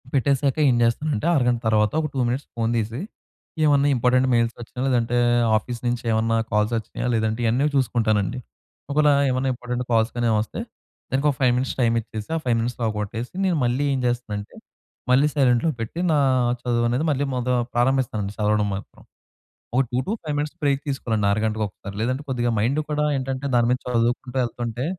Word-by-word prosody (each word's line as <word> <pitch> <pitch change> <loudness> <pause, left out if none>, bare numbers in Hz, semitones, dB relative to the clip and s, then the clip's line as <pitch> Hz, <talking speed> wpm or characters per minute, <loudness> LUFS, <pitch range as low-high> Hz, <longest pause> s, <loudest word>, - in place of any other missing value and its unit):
పెట్టేసాక 140 +1 +1
ఏం 125 - +3
చేస్తానంటే 130 +3 0
అరగంట 125 -4 +2
తర్వాత 105 -1 +3
ఒక 155 - -1
2 135 - -2
మినిట్స్ 130 +4 -2
ఫోన్ 115 -1 0
తీసి 115 +4 -2 0.6
ఏవన్నా 145 -1 +4
ఇంపార్టెంట్ 125 +1 +3
మెయిల్స్ 115 0 +1
వచ్చినా 120 +1 -9
లేదంటే 120 -2 +1 0.4
ఆఫీస్ 120 +2 -2
నుంచి 120 0 -1
ఏమన్నా 110 +1 +1 0.2
కాల్స్ 105 +1 +1
వచ్చినాయా 110 +2 -4
లేదంటే 110 0 0
ఇయన్నీ 120 +5 +2
చూసుకుంటానండి. 115 -4 +1 0.5
ఒకేళ 150 +1 +4 0.2
ఏమైనా 130 +1 0
ఇంపార్టెంట్ 125 0 -4
కాల్స్ 115 0 +2
కానీ 120 0 -1
ఏవైనా 110 - +3
వస్తే - - -8 0.5
దానికి 135 +3 +1
ఒక 140 - -1
5 125 -2 +4
మినిట్స్ 130 +1 -1
టైమ్ 115 -2 +3
ఇచ్చేసి 110 -1 -8
ఆ - - +1
5 120 -2 +2
మినిట్స్‌లో 120 +1 -3
అవ్వగొట్టేసి 110 +3 -4
నేను 180 -3 +1
మళ్ళీ 125 +3 +1
ఏం 135 - 0
చేస్తానంటే 110 -4 -4 0.6
మళ్ళీ 135 +4 +5
సైలెంట్‌లో 130 +1 +3
పెట్టి 115 +9 -5
నా 155 - +3 0.4
చదువు 120 -1 0
అనేది 125 +6 0
మళ్ళీ 140 0 0
మొద 125 0 -2 0.3
ప్రారంభిస్తానండి 120 -5 0
చదవడం 105 -1 +1
మాత్రం. 95 - -10 0.7
ఒక 130 - +5
2-5 150 - -2
మినిట్స్ 150 0 -3
బ్రేక్ 140 -1 +2
తీసుకోవాలండి 115 -7 -1
ఆరగంటకు 110 +1 0
ఒకసారి. 100 +1 -10
లేదంటే 130 +4 -1
కొద్దిగా 120 -2 0
మైండ్ 125 +8 +1
కూడా 150 0 0
ఏంటంటే 135 +1 -3
దాని 120 -1 +3
మీద 125 - +1
చదువుకుంటూ 120 +2 0
వెళ్తుంటే 120 +1 -3
120 Hz, 170 wpm, -23 LUFS, 115-135 Hz, 0.7 s, మళ్ళీ